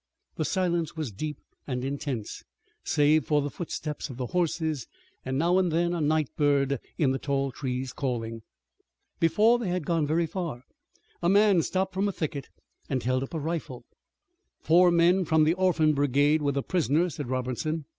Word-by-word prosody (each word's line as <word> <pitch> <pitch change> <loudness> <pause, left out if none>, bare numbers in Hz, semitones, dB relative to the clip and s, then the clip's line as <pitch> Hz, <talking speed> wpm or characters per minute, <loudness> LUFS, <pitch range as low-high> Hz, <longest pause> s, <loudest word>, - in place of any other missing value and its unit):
The - - -1
silence 175 -4 -1
was 150 -7 -3
deep 150 +8 -5 0.3
and 125 -2 -3
intense, 135 -5 -4 0.4
save 150 0 +3
for 150 -1 +3
the 145 0 -2
footsteps 155 -3 -5
of 130 - -8
the 130 - -2
horses 160 -3 -1 0.4
and 130 0 -2
now 175 +5 +3
and 180 -3 +1
then 170 +2 +1
a 170 - -2
night 155 -1 +1
bird 140 -2 +2 0.2
in 145 -5 +2
the 135 - -1
tall 140 -1 -1
trees 130 -1 -4
calling. 115 -4 -3 0.8
Before 215 +8 +4
they 220 -6 -2
had 175 -3 -2
gone 165 -2 +1 0.2
far 160 -7 -5 0.6
a 170 - +2
man 200 -2 +5
stepped 190 +2 -1
from 195 +2 0
a - - -1
thicket 150 -6 -4 0.4
and 130 -3 -1
held 130 +1 +1
up 135 +5 -6
a - - -1
rifle. 155 -5 -4 0.7
"Four 175 +2 +5
men 175 +2 +4
from 160 -2 +3
the 155 +2 +3
Orphan 175 -4 +2
Brigade 145 +2 +2
with 140 -1 0
a 140 - 0
prisoner," 170 -1 +1
said 145 -4 -6
Robertson. 130 +5 -2
155 Hz, 175 wpm, -27 LUFS, 135-170 Hz, 0.8 s, man